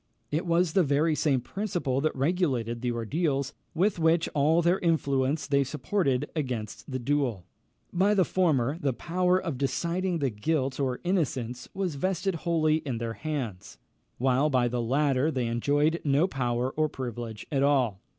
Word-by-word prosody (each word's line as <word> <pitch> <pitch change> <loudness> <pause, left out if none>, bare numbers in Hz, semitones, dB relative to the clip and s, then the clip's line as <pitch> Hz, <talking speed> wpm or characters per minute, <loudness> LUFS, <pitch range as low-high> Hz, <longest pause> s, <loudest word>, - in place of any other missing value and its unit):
It 160 +4 -1
was 170 -1 +2
the 190 - +5
very 155 +1 +2
same 145 -4 +1
principle 165 - -2
that 155 - 0
regulated 135 -7 0
the 125 -1 0
ordeals, 135 +4 -1 0.2
which 185 +3 +1
with 165 0 +3
all 155 +4 +3
their 175 +3 +3
influence 145 -3 +1
they 140 -1 +2
supported 140 0 -1
against 125 -8 -4
the 130 - -2
duel. 125 -7 -1 0.5
By 195 +4 +3
the 185 -3 +4
former, 155 -6 +1
the 140 -5 0
power 180 +6 +1
of 165 -9 -4
deciding 170 +7 -1
the 140 -5 0
guilt 130 +5 -1
or 130 -3 -1
innocence 130 -10 -1
was 190 -4 -1
vested 185 +5 -1
wholly 160 -2 +1
in 135 -6 -4
their 115 0 -3
hands; 120 -10 -5 0.4
while 130 +4 +2
by 125 -3 +2
the 120 0 -1
latter 135 +3 +2
they 130 -6 -1
enjoyed 145 +8 +1
no 145 +4 +3
power 125 -4 -1
or 155 +1 0
privilege 120 -5 -6
at 135 -2 +1
all. 130 -9 +2
145 Hz, 160 wpm, -28 LUFS, 125-165 Hz, 0.5 s, the